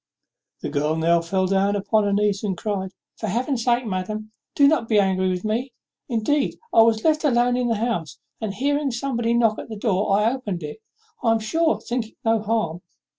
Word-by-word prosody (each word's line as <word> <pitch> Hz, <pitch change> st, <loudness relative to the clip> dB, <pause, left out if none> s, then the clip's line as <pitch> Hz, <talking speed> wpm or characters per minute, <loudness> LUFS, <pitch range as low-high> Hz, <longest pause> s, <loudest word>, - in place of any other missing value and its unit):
The -, -, -2 dB
girl 150 Hz, +2 st, 0 dB
now 165 Hz, +1 st, +3 dB
fell 185 Hz, +3 st, 0 dB
down 195 Hz, +2 st, +2 dB
upon 205 Hz, +1 st, +1 dB
her 200 Hz, -, +1 dB
knees 205 Hz, 0 st, +1 dB
and 195 Hz, -4 st, -2 dB
cried, 195 Hz, -2 st, -3 dB, 0.3 s
"For 220 Hz, -, -4 dB
Heaven's 240 Hz, +4 st, -1 dB
sake, 240 Hz, 0 st, +2 dB
madam, 215 Hz, +2 st, -4 dB, 0.2 s
do 280 Hz, -, +6 dB
not 285 Hz, -6 st, +2 dB
be 215 Hz, -, +3 dB
angry 190 Hz, -1 st, +2 dB
with 180 Hz, +2 st, -3 dB
me. 235 Hz, +4 st, -2 dB, 0.4 s
Indeed, 265 Hz, +5 st, 0 dB, 0.2 s
I 225 Hz, -, +7 dB
was 225 Hz, -1 st, +3 dB
left 310 Hz, 0 st, +2 dB
alone 245 Hz, -3 st, +3 dB
in 250 Hz, -1 st, 0 dB
the 230 Hz, -, +1 dB
house; 205 Hz, -, -2 dB, 0.2 s
and, 215 Hz, -2 st, -2 dB
hearing 285 Hz, +5 st, 0 dB
somebody 235 Hz, -2 st, -1 dB
knock 225 Hz, -2 st, +2 dB
at -, -, -8 dB
the 220 Hz, -, -5 dB
door, 200 Hz, -2 st, +1 dB
I 220 Hz, +4 st, +2 dB
opened 205 Hz, -10 st, -4 dB
it 150 Hz, +9 st, -7 dB, 0.4 s
I 230 Hz, -, +3 dB
am 225 Hz, -, +1 dB
sure 320 Hz, +9 st, +1 dB
thinking 240 Hz, -3 st, -4 dB
no 225 Hz, -1 st, +3 dB
harm. 210 Hz, -6 st, -1 dB
220 Hz, 200 wpm, -23 LUFS, 195-240 Hz, 0.4 s, I